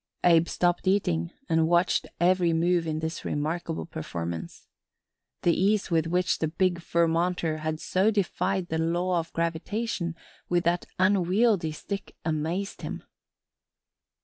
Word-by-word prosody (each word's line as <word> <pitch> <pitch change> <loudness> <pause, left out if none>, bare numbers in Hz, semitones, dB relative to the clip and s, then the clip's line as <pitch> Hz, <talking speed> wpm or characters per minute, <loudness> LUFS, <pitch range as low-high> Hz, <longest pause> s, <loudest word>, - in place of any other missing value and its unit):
Abe 170 -1 +5
stopped 175 +1 0
eating 85 - +1 0.2
and 160 -1 +3
watched 175 +2 +2
every 175 -1 +3
move 170 +1 +2
in 155 0 -2
this 160 +1 -4
remarkable 160 +2 -2
performance. 85 - -6 0.8
The 170 - +4
ease 200 +1 +1
with 165 -1 +2
which 180 +1 +1
the 160 - +1
big 175 +2 0
Vermonter 170 -1 +1
had 155 0 -3
so 190 +5 +2
defied 190 -3 0
the 160 - -1
law 175 +2 +1
of 165 0 -5
gravitation 170 +2 -2 0.3
with 175 0 +2
that 170 +1 0
unwieldly 185 -1 +3
stick 200 +5 -6
amazed 165 +5 -2
him. - - -5
170 Hz, 130 wpm, -27 LUFS, 160-185 Hz, 0.8 s, Abe